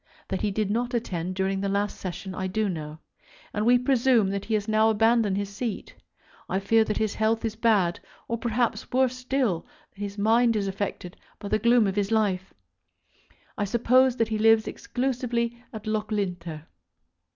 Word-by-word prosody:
That 190 - -2
he 210 - +1
did 205 0 -1
not 240 +3 -1
attend 185 -6 -3
during 190 0 -1
the 200 - -1
last 200 +1 -1
Session 185 +1 -6
I 190 0 -3
do 215 +3 0
know, 155 -4 -5 0.6
and 210 +2 0
we 245 +1 +6
presume 245 -5 +3
that 200 0 -3
he 220 - 0
has 205 -1 -1
now 220 0 +3
abandoned 225 -2 +3
his 200 0 -4
seat. 230 -1 -4 0.6
I 190 - 0
fear 220 +3 +3
that 215 - -2
his 215 -2 0
health 220 +1 0
is 220 -1 -2
bad, 210 -6 +2 0.3
or 230 0 -2
perhaps, 235 0 -1
worse 255 0 +2
still, 250 -8 -1 0.3
that - - -22
his 200 0 -5
mind 230 +3 +3
is 205 -2 0
affected 190 -2 -4 0.2
by 205 - -7
the 215 - +2
gloom 235 +1 +4
of 195 -1 -1
his 200 +1 0
life. 195 -4 0 1.1
I 205 - +1
suppose 250 +4 +3
that 230 -2 0
he 215 -1 -1
lives 225 0 +5
exclusively 240 -2 -2
at 220 -1 -8
Loughlinter. 200 -7 -3
215 Hz, 180 wpm, -26 LUFS, 195-235 Hz, 1.1 s, we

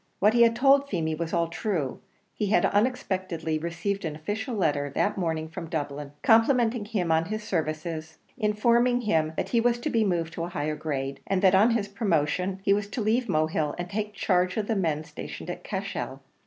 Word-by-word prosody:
What 210 +3 +4
he 240 - +4
had 230 -1 +6
told 275 +2 +4
Feemy 160 - -1
was 165 +1 -3
all 170 -1 +1
true; 165 - -2 0.3
he 210 - -2
had 215 - +3
unexpectedly 185 -8 0
received 170 +5 -3
an 155 -3 -3
official 210 +10 -4
letter 145 -7 0
that 205 - +1
morning 160 -4 -2
from 170 +1 -7
the - - -12
Dublin 145 -3 -3
office, 145 +1 -21
complimenting 230 -1 +4
him 195 -6 -1
on 160 0 +3
his 215 +3 -4
services, 160 -2 -3 0.2
informing 235 +2 +2
him 160 -8 +1
that - - -2
he 235 - +2
was 240 0 +2
to - - -2
be 225 -1 +3
moved 170 -5 -1
to 165 - -4
a 170 - -3
higher 155 -3 -2
grade, 135 -3 -3
and 195 0 0
that 190 -1 +6
on 200 +5 +6
his 225 -3 0
promotion 190 -2 0
he 200 - +4
was 205 0 0
to 205 - -5
leave 225 +2 +1
Mohill, 155 -2 0
and 175 0 -5
take 210 0 -3
charge 180 -1 +1
of 215 - 0
the 225 - -1
men 160 -6 0
stationed - - -7
at - - -8
Cashel. - - -4
185 Hz, 210 wpm, -27 LUFS, 160-215 Hz, 0.3 s, had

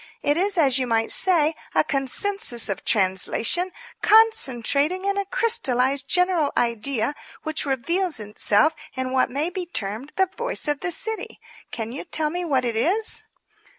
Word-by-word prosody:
It 290 - +1
is, 390 +3 0
as 275 -5 +3
you 255 - -2
might 225 -1 +2
say, 330 -4 +5 0.2
a - - +4
consensus 275 - +1
of 195 -1 -4
translation, 215 - +1 0.3
concentrating 370 - +3
in 400 0 0
a 400 0 -2
crystallized, 275 - +1
general 360 -4 +1
idea 235 +3 -1 0.3
which 315 -1 -2
reveals 330 +4 -2
itself 210 +6 +1 0.2
in 260 0 -4
what 260 -1 +1
may 295 +7 -2
be 360 -1 -6
termed 225 - -5
the 380 - +2
Voice 485 -6 -1
of 295 -1 -1
the 365 - -3
City. 440 +6 -3 0.3
Can 225 -1 -6
you 265 - -7
tell 315 -3 -2
me 355 +2 -3
what 270 -7 -1
it 235 -2 -3
is?" 385 - -1
295 Hz, 155 wpm, -22 LUFS, 245-365 Hz, 0.3 s, say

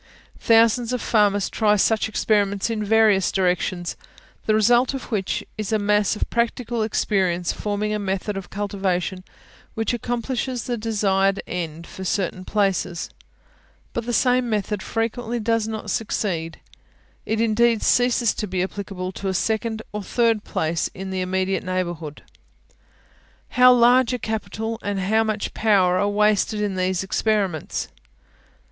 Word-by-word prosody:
Thousands 230 +1 +4
of 250 - 0
farmers 205 -4 +2
try 210 -2 +2
such 220 +2 +2
experiments 205 -1 +1
in 215 -2 -2
various 210 -3 +3
directions, 180 -1 0 0.5
the 215 - +4
result 240 +5 +3
of 265 - -7
which 195 -4 -1 0.2
is 215 -1 -3
a 220 - +3
mass 210 0 +2
of - - -2
practical 235 0 -1
experience 190 -5 0
forming 210 0 -2
a 210 - -1
method 195 +1 -2
of 195 -2 -6
cultivation 190 -2 -2 0.5
which 225 +2 -1
accomplishes 245 +1 -2
the 245 - -2
desired 200 -3 +1
end 165 -1 -5
for 190 - -9
certain 185 -1 -2
places; 195 -4 -1 0.8
but 235 0 -3
the - - 0
same 250 0 +2
method 210 -2 -1
frequently 230 +2 -2
does 225 0 0
not 220 -1 -4
succeed, 170 -7 -2 0.7
it 220 0 0
indeed 230 0 +2
ceases 245 -3 +3
to 210 - -4
be 185 -1 -1
applicable 190 -1 -5
to 195 - -6
a 190 - -1
second 220 +2 -1
or 210 - -3
third 230 0 +1
place 160 +1 -1
in 190 0 -6
the 190 -1 -2
immediate 190 +1 -1
neighbourhood. 175 -5 -4 1.3
How 250 0 +6
large 245 0 +5
a - - 0
capital, 220 0 -4
and 200 -1 -2
how 220 +4 +2
much 215 -1 -2
power, 190 -5 +3
are 205 - +1
wasted 210 +1 +2
in 205 -2 -1
these 185 0 0
experiments! 195 -4 -1
210 Hz, 145 wpm, -23 LUFS, 190-225 Hz, 1.3 s, How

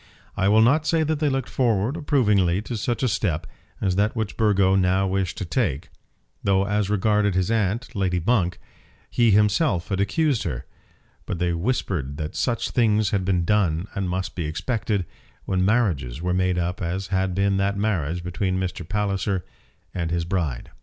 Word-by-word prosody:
I 95 - +1
will 110 +2 +5
not 150 +7 +3
say 165 -1 +2
that 155 -1 -1
they 150 -1 +2
looked 135 -2 -1
forward 115 0 +1
approvingly 105 - +2
to 120 - -5
such 120 +4 -2
a - - +3
step 95 -7 -1 0.3
as 95 -2 0
that 105 +3 +1
which 110 -3 -3
Burgo 100 -4 +3
now 95 0 +2
wished 95 -2 -1
to 100 - -3
take, 85 - -1 0.5
though 95 0 +2
as 105 0 0
regarded 105 -1 +2
his 95 +3 +1
aunt, 115 +3 0
Lady 95 -3 0
Monk, 90 -2 +1 0.5
he 120 -1 +3
himself 105 - +2
had 95 -2 -1
accused 140 +4 +1
her; 70 -5 -4 0.6
but 90 - -2
they 85 0 0
whispered 85 - -2
that 75 -1 -5
such 120 -2 -1
things 110 -4 +2
had 100 -2 +1
been 90 -2 +1
done 90 -4 +1
and 95 -2 -2
must 95 +1 -3
be 85 - -3
expected, 100 +4 -2 0.4
when 95 -1 0
marriages 90 - +1
were 90 +2 -1
made 90 0 +1
up 90 +2 -2
as 95 +2 -3
had 95 -1 0
been 100 0 +2
that 100 +1 0
marriage 90 -5 -1
between 95 +1 -1
Mr. 90 -2 -4
Palliser 100 -2 -1 0.5
and 85 -3 -2
his 85 0 -1
bride. 85 -9 -2
95 Hz, 180 wpm, -24 LUFS, 90-110 Hz, 0.6 s, will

